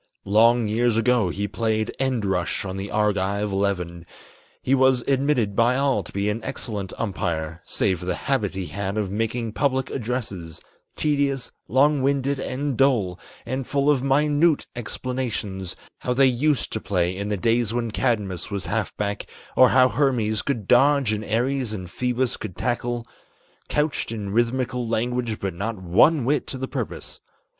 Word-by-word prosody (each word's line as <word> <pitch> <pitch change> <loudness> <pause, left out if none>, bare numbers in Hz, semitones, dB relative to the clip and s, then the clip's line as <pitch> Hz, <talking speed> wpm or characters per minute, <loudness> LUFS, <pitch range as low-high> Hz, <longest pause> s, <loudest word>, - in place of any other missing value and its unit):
Long 115 +3 +4
years 115 +1 +2
ago 115 -4 +3
he 100 +4 -2
played 110 0 -1
end 130 -5 0
rush 90 -1 -1
on 95 -1 -4
the 95 +1 -5
Argive 100 -1 0
eleven; 90 -4 -2 0.6
He 130 - +2
was 130 -2 +4
admitted 135 -7 +1
by 120 +3 +3
all 135 -6 +2
to 90 - -11
be 100 +1 -1
an 110 +2 -2
excellent 100 -5 -4
umpire 85 -6 -3
Save 95 -4 0
for 90 - -7
the 90 -1 -1
habit 110 -9 -1
he 95 -1 -3
had 100 +2 -4
of 100 -3 -1
making 115 +1 -2
public 130 0 0
addresses, 110 - -4 0.4
Tedious, 140 -3 0 0.2
long 140 +2 +3
winded 140 0 +1
and 140 +1 -2
dull, 110 -9 +2 0.3
and 130 +2 -3
full 140 +1 +2
of 135 -4 +2
minute 145 +3 +3
explanations, 115 -6 -4 0.2
How 125 - -1
they 135 +1 +5
used 135 +3 +1
to 110 - -2
play 90 -2 0
in 100 +2 -3
the 105 - 0
days 115 +3 +1
when 115 -1 -2
Cadmus 105 -5 -1
was 100 -4 -4
half - - -2
back, 100 0 -2 0.3
Or 130 -1 +7
how 130 0 +6
Hermes 120 -7 +1
could 120 -8 -3
dodge, 135 -1 +4
and 105 0 -3
Ares 120 +2 0
and 95 -4 -5
Phoebus 125 +2 -1
could 95 -5 -7
tackle; 120 -1 -1 0.6
Couched 150 -5 0
in 105 -3 -4
rhythmical 120 +2 0
language 120 0 -1
but 95 -2 -3
not 100 +5 -3
one 110 - +4
whit 145 +3 +1
to 130 - -4
the 130 +1 -3
purpose. 130 -5 -5
115 Hz, 165 wpm, -24 LUFS, 100-130 Hz, 0.6 s, Or